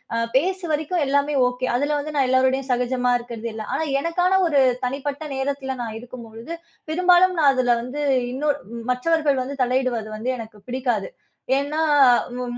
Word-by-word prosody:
அ -, -, +1 dB, 0.2 s
பேசு 370 Hz, +7 st, +1 dB
வரைக்கு 310 Hz, +4 st, -1 dB
எல்லாமே 285 Hz, +1 st, +1 dB
ஓகே. 250 Hz, +1 st, -3 dB
அதுல 290 Hz, +4 st, 0 dB
வந்து 300 Hz, +1 st, -6 dB
நான் 270 Hz, -2 st, +3 dB
எல்லாரோடையும் 260 Hz, +1 st, +2 dB
சகஜமா 250 Hz, 0 st, +1 dB
இருக்கிறது 235 Hz, -1 st, -6 dB
எல்லாம். 220 Hz, -1 st, -6 dB
ஆனா 320 Hz, -, -1 dB, 0.2 s
எனக்கான 360 Hz, +4 st, +2 dB
ஒரு 290 Hz, -4 st, +3 dB, 0.2 s
தனிப்பட்ட 280 Hz, +3 st, -3 dB
நேரத்துல 265 Hz, -1 st, -3 dB
நான் 220 Hz, -1 st, -5 dB
இருக்கும்பொழுது, 235 Hz, +1 st, -10 dB, 0.4 s
பெரும்பாலும் 360 Hz, +1 st, +4 dB
நான் 290 Hz, -3 st, +6 dB
அதுல 245 Hz, -2 st, +3 dB
வந்து 265 Hz, +4 st, -5 dB, 0.3 s
இன்னொர் 290 Hz, +2 st, 0 dB, 0.3 s
மற்றவர்கள் 285 Hz, +1 st, +1 dB
வந்து 275 Hz, +2 st, -6 dB
தலையிடுவது 245 Hz, -3 st, -1 dB
வந்து 240 Hz, +4 st, -2 dB
எனக்கு 220 Hz, -2 st, -10 dB
பிடிக்காது. 245 Hz, -6 st, -1 dB, 0.5 s
ஏன்னா, 285 Hz, +3 st, -2 dB, 0.6 s
ம் 245 Hz, -1 st, -4 dB
265 Hz, 155 wpm, -22 LUFS, 245-295 Hz, 0.6 s, நான்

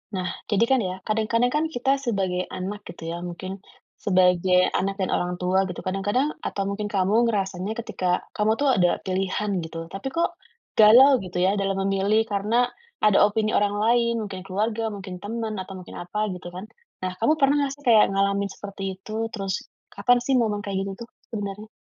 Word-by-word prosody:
Nah, 185 Hz, -, -2 dB, 0.2 s
jadi 210 Hz, +2 st, +3 dB
kan 265 Hz, +2 st, +3 dB
ya, 185 Hz, -2 st, -2 dB
kadang-kadang 225 Hz, +3 st, +1 dB
kan 300 Hz, +1 st, +2 dB
kita 270 Hz, -1 st, 0 dB
sebagai 190 Hz, -7 st, -1 dB
anak 195 Hz, +3 st, -5 dB
gitu 165 Hz, -1 st, -6 dB
ya, 170 Hz, -, -5 dB
mungkin 185 Hz, +2 st, -6 dB, 0.3 s
sebagai 180 Hz, -1 st, +3 dB
anak 195 Hz, +1 st, -1 dB
dan 190 Hz, -, -1 dB
orang 180 Hz, 0 st, -1 dB
tua 185 Hz, +2 st, +1 dB
gitu 180 Hz, -, -7 dB
kadang-kadang 205 Hz, +10 st, 0 dB
atau 195 Hz, -, -2 dB
mungkin 200 Hz, +1 st, -3 dB
kamu 205 Hz, +4 st, +2 dB
ngerasanya 195 Hz, -1 st, -2 dB
ketika 180 Hz, -4 st, -1 dB
kamu 210 Hz, +1 st, +1 dB
tuh 285 Hz, -, +1 dB
ada 180 Hz, -4 st, +3 dB
pilihan 190 Hz, 0 st, -1 dB
gitu. 165 Hz, 0 st, -6 dB
Tapi 195 Hz, +7 st, -5 dB
kok, 335 Hz, +5 st, 0 dB, 0.4 s
galau 245 Hz, +5 st, +7 dB
gitu 180 Hz, -1 st, -6 dB
ya 185 Hz, +2 st, +3 dB
dalam 195 Hz, 0 st, 0 dB
memilih, 200 Hz, +3 st, +2 dB
karena 215 Hz, +4 st, +1 dB, 0.4 s
ada 210 Hz, -2 st, +5 dB
opini 215 Hz, +1 st, +2 dB
orang 205 Hz, 0 st, +2 dB
lain, 235 Hz, +2 st, +3 dB
mungkin 190 Hz, -2 st, -7 dB
keluarga, 215 Hz, +4 st, -1 dB
mungkin 190 Hz, -3 st, -8 dB
teman, 225 Hz, +1 st, -3 dB
atau 190 Hz, 0 st, -8 dB
mungkin 180 Hz, -, -11 dB
apa 210 Hz, +5 st, -2 dB
gitu 180 Hz, -1 st, -8 dB
kan. 185 Hz, +4 st, -8 dB, 0.4 s
Nah, 185 Hz, -, -2 dB
kamu 265 Hz, +7 st, +4 dB
pernah 280 Hz, -1 st, +4 dB
gak -, -, -7 dB
sih, 285 Hz, -, -19 dB
kayak 225 Hz, -3 st, +6 dB
ngalamin 200 Hz, 0 st, +1 dB
seperti 195 Hz, 0 st, -8 dB
itu? 220 Hz, +3 st, -4 dB
Terus 195 Hz, -4 st, -3 dB, 0.4 s
kapan 245 Hz, +5 st, +3 dB
sih 270 Hz, -, +1 dB
momen 210 Hz, -3 st, 0 dB
kayak 200 Hz, -1 st, -2 dB
gini -, -, -4 dB
tuh, 235 Hz, -, -8 dB, 0.2 s
sebenarnya? 210 Hz, -1 st, -5 dB
200 Hz, 185 wpm, -24 LUFS, 185-225 Hz, 0.4 s, galau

